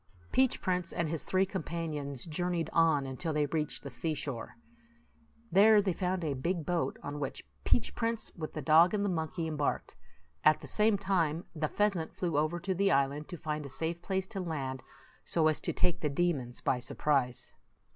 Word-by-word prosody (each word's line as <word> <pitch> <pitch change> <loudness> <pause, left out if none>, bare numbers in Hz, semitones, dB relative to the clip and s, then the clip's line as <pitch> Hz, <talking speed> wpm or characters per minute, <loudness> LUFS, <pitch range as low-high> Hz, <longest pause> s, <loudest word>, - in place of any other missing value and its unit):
Peach 260 -1 +3
Prince 180 -2 -1
and 170 - -1
his 160 0 -1
three 190 +1 +2
companions 155 -7 -4
jour 175 +2 -2
neyed 170 -3 -1
on 160 -4 +4
until 135 +5 -3
they 150 -1 +2
reached 150 +1 -2
the 140 - -6
seashore. 135 -1 -3 1.0
There 210 +3 +7
they 195 -3 +1
found 180 0 -1
a 150 -3 0
big 165 +4 -2
boat, 175 -2 0
on 145 +1 -5
which 140 -2 -4 0.2
Peach 240 - +2
Prince, 230 -1 -2
with 155 -2 -6
the 155 - -4
dog 165 +7 +6
and 205 -1 0
the - - +1
monkey, 165 -1 -2
embarked; 150 -2 -2 0.5
at 155 0 +6
the - - -10
same 210 -1 +3
time, 175 -5 0
the 155 -1 0
pheasant 195 -6 0
flew 170 -4 -1
over 155 +4 +1
to 190 +2 -1
the 195 +2 +2
island 140 0 +1
to 175 - -7
find 155 -2 -3
a 140 - -7
safe 165 +5 -3
place 190 +1 -1
to 210 -4 -5
land, 140 -7 -3 0.4
so 160 -2 +2
as 155 - +2
to - - 0
take 175 0 +1
the 150 - +1
demons 140 -6 -1
by 125 - +1
surprise. 130 -1 0
160 Hz, 190 wpm, -31 LUFS, 145-180 Hz, 1.0 s, There